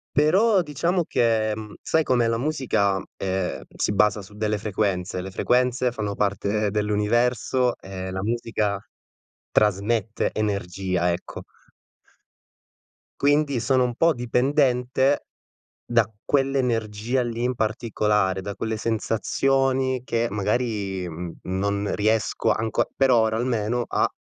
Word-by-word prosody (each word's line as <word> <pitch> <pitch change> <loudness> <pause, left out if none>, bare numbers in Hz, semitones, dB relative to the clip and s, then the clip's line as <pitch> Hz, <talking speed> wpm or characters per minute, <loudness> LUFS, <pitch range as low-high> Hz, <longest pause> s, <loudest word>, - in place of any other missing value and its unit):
però 190 +7 +4
diciamo 170 +3 0
che 110 -2 +1
mhmm, 105 -1 -8
sai 160 0 +2
com'è 120 -4 +2
la 115 0 +1
musica, 120 -9 0
ehm, 95 -1 -2
si - - -1
basa 105 0 +3
su 100 +2 -14
delle 105 0 -1
frequenze. 95 -3 -1
Le 95 +1 -7
frequenze 125 +2 +1
fanno 105 -3 -3
parte 100 +1 0
dell'universo 115 +4 +1
e 95 -1 -6
la 95 0 -3
musica 110 -2 -1 0.7
trasmette 105 +2 +1
energia, 95 -4 -1
ecco. 90 - -7 1.8
Quindi 145 -2 +2
sono 130 +2 +2
un 120 -1 -1
po' 165 +4 +4
dipendente 130 +2 +1 0.6
da 115 -2 +2 0.2
quell'energia 125 -4 0
lì 120 0 -3
in 125 +1 +1
particolare, 105 -4 0
da 100 +1 -5
quelle 110 -1 -3
sensazioni, 130 +4 0
che 120 -1 0
magari, 105 -3 -1
mhmm 85 +1 -6
non 100 +2 -1
riesco 110 0 +1
anco 110 0 0
per 135 -1 +3
ora 110 -2 +3
almeno, 120 0 0
a - - +2
110 Hz, 120 wpm, -24 LUFS, 100-125 Hz, 1.8 s, però